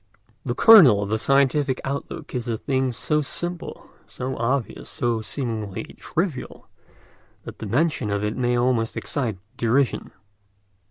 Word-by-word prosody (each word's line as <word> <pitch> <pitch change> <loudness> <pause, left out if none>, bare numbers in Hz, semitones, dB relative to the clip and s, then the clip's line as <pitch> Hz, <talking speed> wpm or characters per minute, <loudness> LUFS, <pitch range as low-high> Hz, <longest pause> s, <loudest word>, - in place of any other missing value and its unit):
The 120 -2 -2
kernel 140 - +8
of 100 - -5
the 110 +1 0
scientific 140 0 +2
outlook 140 +3 -5
is 125 -2 -3
a 115 -2 -1
thing 130 +1 -1
so 125 +6 -1
simple, 175 +4 -4 0.2
so 130 +1 -5
obvious, 120 +2 -2
so 120 -2 -1
seemingly 110 -5 -4
trivial, 165 -6 -4 0.8
that - - -10
the 110 - -5
mention 145 0 0
of 100 0 -1
it 105 +1 -1
may 120 -1 +1
almost 120 -2 0
excite 120 -9 -2 0.2
derision. 125 +3 +1
125 Hz, 140 wpm, -23 LUFS, 115-140 Hz, 0.8 s, kernel